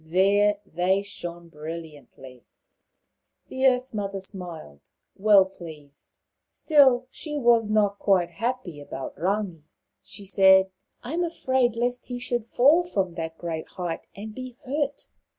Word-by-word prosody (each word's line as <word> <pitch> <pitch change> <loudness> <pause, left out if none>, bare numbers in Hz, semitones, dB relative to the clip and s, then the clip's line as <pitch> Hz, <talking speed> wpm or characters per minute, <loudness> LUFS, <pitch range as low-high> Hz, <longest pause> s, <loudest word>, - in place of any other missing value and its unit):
There 200 +5 +3
they 185 +3 0
shone 175 -4 -8
brilliantly. 150 -5 -10 1.1
The 260 +1 +2
Earth 250 0 +1
mother 200 -2 -3
smiled, 170 - -9 0.3
well 200 -1 +6
pleased. 155 -6 -13 0.4
Still, 265 -5 +4
she 295 -2 -5
was 235 -5 +3
not 205 -2 +2
quite 180 -4 +2
happy 215 -4 -3
about 135 -2 -7
Rangi. 185 0 -2 0.4
She 200 - -11
said, 190 0 +5 0.2
" - - -46
I 255 - -6
am 350 +2 0
afraid 260 -8 0
lest 245 +1 -1
he 245 - -4
should 245 -2 -2
fall 280 +8 +4
from 195 - -2
that 165 -1 -5
great 165 -2 -5
height 175 -3 -5
and 215 +2 -8
be 255 0 -8
hurt." 285 +1 -2
200 Hz, 135 wpm, -25 LUFS, 170-245 Hz, 1.1 s, well